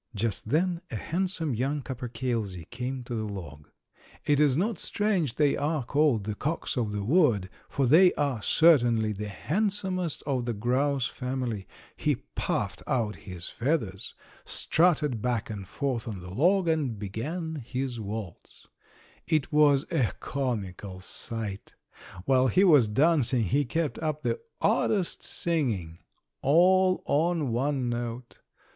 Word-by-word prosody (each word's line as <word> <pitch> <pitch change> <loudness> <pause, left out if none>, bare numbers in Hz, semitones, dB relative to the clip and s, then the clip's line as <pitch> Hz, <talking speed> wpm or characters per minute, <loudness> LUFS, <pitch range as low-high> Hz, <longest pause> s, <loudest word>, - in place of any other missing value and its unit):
Just 110 0 -2
then 170 +4 +1
a - - -5
handsome 170 - -1
young 135 +5 -1
capercailzie 115 -8 -3
came 125 +1 -4
to 120 - -6
the 110 -2 -2
log. 75 -7 -8 0.6
It 145 -1 +3
is 145 -3 +4
not 200 +1 0
strange 190 - 0
they 145 0 +3
are 150 -2 -1
called 140 -5 +2
the 105 +1 -3
"cocks 155 +11 -3
of 115 -5 -1
the 105 -1 -3
wood," 115 - +3 0.2
for 140 - 0
they 175 +8 +7
are 140 -6 -1
certainly 120 -8 +4
the 105 +1 -4
handsomest 185 - -2
of 130 -4 -1
the 120 -2 -2
grouse 130 +4 +1
family. 125 -6 -3 0.3
He - - +1 0.2
puffed - - -2
out 115 -5 0
his 90 -4 -8
feathers, 115 - -2 0.3
strutted 150 -8 +1
back 120 -3 -1
and 100 -3 -6
forth 130 0 -2
on 105 -4 -5
the 90 +1 -9
log 180 - +3
and 150 -8 0
began 155 - -4
his 125 0 -3
waltz. 105 -4 -7 0.6
It 155 -3 +1
was 145 -1 +5
a 135 -10 +1
comical 100 -8 -3
sight! 105 0 -6 0.5
While 130 -1 +4
he 185 +9 +4
was 150 - +6
dancing 135 0 +3
he 140 +10 +1
kept 155 +5 -2
up 155 -1 -2
the - - 0 0.2
oddest 195 -5 +1
singing 110 - -2 0.4
all 185 +5 +4
on 160 -3 +1
one 130 +2 0
note. 120 0 -4
130 Hz, 140 wpm, -28 LUFS, 110-155 Hz, 0.6 s, they